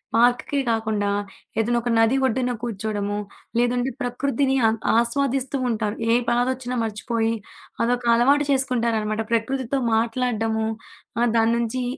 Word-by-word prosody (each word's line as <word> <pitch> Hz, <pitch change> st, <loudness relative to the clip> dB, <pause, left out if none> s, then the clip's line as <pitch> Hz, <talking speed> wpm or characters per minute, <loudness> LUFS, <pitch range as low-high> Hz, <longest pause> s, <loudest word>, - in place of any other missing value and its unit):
పార్కుకే 245 Hz, +4 st, +3 dB
కాకుండా 220 Hz, -2 st, 0 dB, 0.5 s
ఏదైనా 235 Hz, +2 st, +2 dB
ఒక 240 Hz, -, -3 dB
నది 225 Hz, +3 st, +4 dB
ఒడ్డున 250 Hz, 0 st, 0 dB
కూర్చోడము 205 Hz, -2 st, -2 dB, 0.4 s
లేదంటే 245 Hz, +2 st, +1 dB
ప్రకృతిని 265 Hz, +2 st, 0 dB
ఆ -, -, +5 dB, 0.3 s
ఆస్వాదిస్తూ 270 Hz, +3 st, 0 dB
ఉంటారు. 215 Hz, -2 st, -1 dB, 0.2 s
ఏ -, -, +5 dB, 0.2 s
బాధొచ్చినా 250 Hz, +1 st, 0 dB
మర్చిపోయి 225 Hz, +1 st, -1 dB, 0.5 s
అదొక 245 Hz, +1 st, 0 dB
అలవాటు 280 Hz, +5 st, +4 dB
చేసుకుంటారనమాట. 230 Hz, -5 st, 0 dB
ప్రకృతితో 260 Hz, +3 st, 0 dB, 0.2 s
మాట్లాడడము 225 Hz, -1 st, 0 dB, 0.6 s
ఆహ్, 240 Hz, -, +3 dB
దాని 225 Hz, +1 st, +3 dB
నుంచి 235 Hz, +2 st, -1 dB
235 Hz, 115 wpm, -23 LUFS, 225-255 Hz, 0.6 s, ఆ